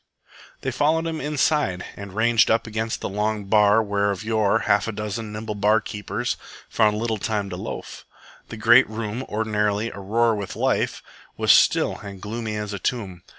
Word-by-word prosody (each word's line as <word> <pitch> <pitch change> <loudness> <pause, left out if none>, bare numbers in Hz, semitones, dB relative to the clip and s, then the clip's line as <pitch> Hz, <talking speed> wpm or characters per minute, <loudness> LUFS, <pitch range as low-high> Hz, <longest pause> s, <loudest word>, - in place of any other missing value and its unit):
They 130 - -2
followed 155 +5 +1
him 160 -1 -3
inside 145 - 0
and 100 -2 -9
ranged 110 0 +3
up 115 - +2
against 110 0 -3
the - - -2
long 105 +1 -1
bar 105 +1 +4
where 100 -1 0
of 100 +1 -3
yore 110 -2 +1
a 115 - +1
half 105 +2 +2
dozen 105 +1 -4
nimble 105 0 -5
bar 105 +2 +3
keepers 105 -1 -4 0.3
found 105 -2 +2
little 110 -1 -2
time 105 -2 -2
to - - -4
loaf. - - -7 0.5
The - - -7
great 120 +3 +6
room, 110 +2 -4
ordinarily 105 0 0
aroar 115 +4 +1
with 100 -3 -5
life, - - 0 0.3
was - - +4
still - - +4
and 100 -2 -9
gloomy 110 +1 -4
as 105 -1 -4
a 100 - -4
tomb. 95 -6 -3
110 Hz, 175 wpm, -23 LUFS, 105-115 Hz, 0.5 s, great